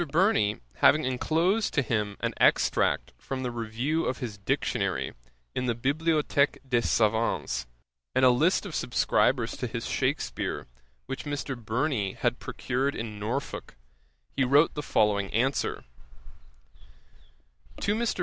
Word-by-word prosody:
Burney 155 - +3 0.2
having 155 +1 +5
enclosed 165 - +1
to 140 - +3
him 105 -3 -1
an - - -1
extract - - +2
from 130 - -4
the 125 - -2
review 120 +7 -1
of 130 - -1
his 110 -5 -6
Dictionary 100 - -1 0.4
in 125 - -2
the 120 - +1
_Bibliothèque 145 +2 +1
des 125 -2 +2
Savans, 110 - +1 0.5
and 130 - +5
a 125 - +8
list 160 +12 +2
of 185 - -6
subscribers 120 - +1
to - - -3
his - - -4
Shakspeare, - - -2 0.4
which 135 - -5
Mr. 145 -2 -3
Burney 115 -2 -1
had - - -1
procured 135 +3 -2
in 110 -2 -5
Norfolk, 115 - -4 0.6
he 135 - +2
wrote 140 +5 +4
the 150 - -3
following 105 -7 +1
answer: 130 +4 0 2.0
'To 205 - +1
MR. 230 -2 -1
130 Hz, 130 wpm, -28 LUFS, 115-150 Hz, 2.0 s, a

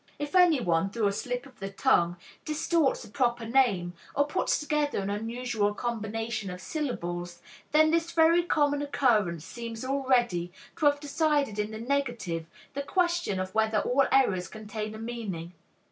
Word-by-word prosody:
If 290 0 -5
anyone, 245 - +4
through 220 +1 -1
a 200 - +3
slip 245 +5 -3
of 260 -3 -17
the 195 - -4
tongue, 175 -3 +2 0.3
distorts 305 -3 +1
a - - -12
proper 240 +1 0
name, 220 -8 +2 0.2
or 285 - +3
puts 330 +5 0
together 295 -1 0
an 195 0 -1
unusual 225 -1 -1
combination 225 -2 -3
of 180 0 -6
syllables, 175 - -4 0.3
then 310 +1 +5
this 335 0 +1
very 330 +1 +5
common 290 -4 +1
occurrence 215 - +1
seems 230 0 -6
already 245 -10 +1 0.3
to 300 - +4
have 290 0 +3
decided 290 -6 0
in 210 0 0
the 220 - -6
negative 235 -10 -2 0.3
the 280 - -2
question 345 - 0
of 185 0 -4
whether 220 0 +2
all 265 +2 +2
errors 205 -10 +3
contain 215 0 -6
a - - -7
meaning. 215 -7 -5
235 Hz, 160 wpm, -28 LUFS, 205-285 Hz, 0.3 s, then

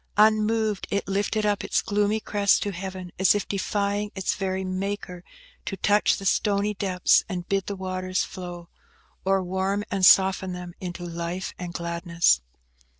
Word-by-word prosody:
Unmoved, 215 -1 +3
it 200 - -1
lifted 205 +2 0
up 205 -1 +1
its - - 0
gloomy 205 +1 +1
crest 205 -2 +2
to 205 - -2
Heaven, 185 -1 -6
as 190 +2 +5
if 205 - -2
defying 205 +1 -1
its 190 -1 0
very 190 -1 -2
Maker 185 -1 -4 0.4
to 195 - -3
touch 205 +3 +3
the 195 - -8
stony 205 +1 +1
depths 190 -3 +3
and 180 -2 -4
bid 195 -1 0
the 200 - -3
waters 185 -1 -2
flow, 175 -2 -8 0.6
or 195 0 +2
warm 190 +3 -1
and 195 -2 -1
soften 190 0 +5
them 180 -1 -7
into 175 -1 -5
life 170 +2 -4
and 180 -1 -5
gladness! 170 - +1
190 Hz, 155 wpm, -25 LUFS, 180-205 Hz, 0.6 s, as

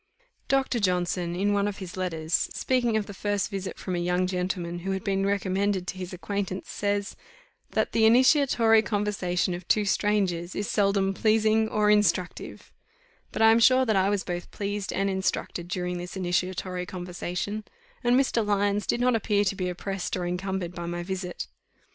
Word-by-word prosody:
Dr. 270 -3 +1
Johnson, 180 -2 0
in 200 +3 +1
one 200 0 +1
of 205 - -4
his 185 -3 -8
letters, 165 -3 -3 0.2
speaking 240 -4 +1
of 210 - -2
a 205 - -7
first 205 +1 -1
visit 195 -1 -4
from 185 - -5
a - - -1
young 180 +1 +1
gentleman 180 -1 -2
who 190 +2 -2
had 190 - -3
been 195 -1 0
recommended 195 -1 0
to 180 - -5
his 180 -1 -5
acquaintance, 190 +1 -4
says, 205 0 -1 0.6
that - - +1
"the 220 -1 +4
initiatory 240 -2 +5
conversation 200 -5 -1
of 175 0 -7
two 210 -1 +3
strangers 195 -4 0
is 205 - -2
seldom 195 -1 +2
pleasing 220 +1 +3
or 210 0 +3
instructive;" 185 -4 0 0.6
but 220 - 0
I 225 - +8
am 225 - +5
sure 255 +2 +5
that 220 -3 +1
I 190 0 +3
was 205 -2 0
both 175 -1 -5
pleased 205 0 -3
and 195 +1 0
instructed 190 -2 -2
during 180 -1 -3
this 180 +2 -7
initiatory 180 0 -2
conversation, 180 +3 -4 0.4
and 245 +1 +4
Mr. 245 -4 +1
Lyons 205 0 +1
did 240 - 0
not 250 0 +3
appear 205 -2 +1
to 195 -1 0
be 185 -1 -2
oppressed 190 +1 -3
or 180 - -2
encumbered 180 0 -3
by 175 -1 -5
my 175 0 -3
visit. 185 -1 -4
195 Hz, 180 wpm, -27 LUFS, 180-210 Hz, 0.6 s, I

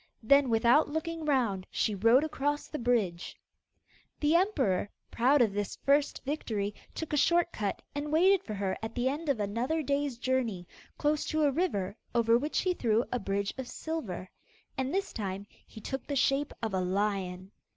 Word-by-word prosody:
Then 280 +3 +5
without 235 +7 +4
looking 320 +1 -3
round, 235 -10 +1
she 215 - 0
rode 230 +7 +4
across 290 -1 -1
the 305 - -5
bridge. 220 -8 0 0.8
The 300 +1 +2
emperor, 280 - +2 0.2
proud 260 +3 +4
of 215 -4 0
this 205 0 -3
first 285 +1 +2
victory, 215 -8 -2 0.2
took 320 -2 -5
a - - +2
short 345 +3 +3
cut, 205 -2 -3
and 290 +1 -4
waited 370 +4 +5
for 215 - -5
her 195 -1 -1
at 220 0 -5
the 245 0 0
end 295 +4 -2
of 270 -6 +1
another 235 +10 -1
day's 280 -2 -1
journey, 235 -8 -1 0.3
close 295 0 +1
to 310 -1 0
a 290 - +4
river, 255 - -1 0.2
over 230 -1 +4
which 290 +6 0
he 370 - +1
threw 230 -6 +1
a 250 - 0
bridge 200 -1 -2
of 260 - -4
silver. 230 - -5 0.5
And 265 0 -2
this 390 +3 -2
time 200 -2 -4 0.2
he - - -11
took 265 +4 -5
the 285 - -2
shape 275 +2 +2
of 220 -3 -1
a 185 - +1
lion. 190 -1 -2
250 Hz, 180 wpm, -30 LUFS, 205-295 Hz, 0.8 s, Then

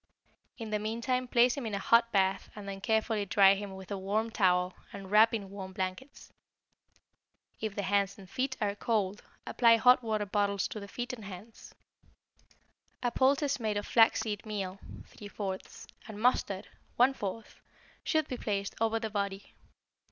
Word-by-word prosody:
In 225 -3 -7
the 210 - 0
meantime 235 +4 -2
place 240 0 +4
him 275 -5 -4
in 210 - -3
a - - -1
hot 230 +3 +3
bath 190 -1 +1
and 205 -1 -9
then 195 0 -6
carefully 220 0 +1
dry 195 0 +5
him 200 -1 -5
with 190 +1 -11
a 200 - -3
warm 215 +4 -1
towel 180 -3 +2 0.2
and 195 -1 -9
wrap 220 +2 +6
in 200 -4 -4
warm 190 -1 -7
blankets. 190 +10 -6 1.3
If 215 -2 -4
the 205 - -2
hands 200 0 +1
and 195 - -13
feet 260 +4 -2
are 205 -2 0
cold, 205 -2 -1 0.2
apply 230 -2 +5
hot 250 +3 +6
water 215 -3 -1
bottles 200 -1 0
to 215 - -6
the 200 - -8
feet 245 +5 -5
and 225 -4 -8
hands. 200 +4 -11 1.3
A 245 - +1
poultice 275 +2 +2
made 215 -3 -1
of 205 - -3
flaxseed 225 -2 +3
meal 195 -3 -4 0.2
(3/4) 200 -2 -7 0.2
and 215 -2 -8
mustard 210 -5 +1 0.3
(1/4) 225 -4 +1 0.6
should 315 -2 +1
be 250 - -4
placed 200 -3 -2
over 225 0 +2
the 220 -1 -4
body. 200 -1 -4
210 Hz, 165 wpm, -30 LUFS, 195-230 Hz, 1.3 s, wrap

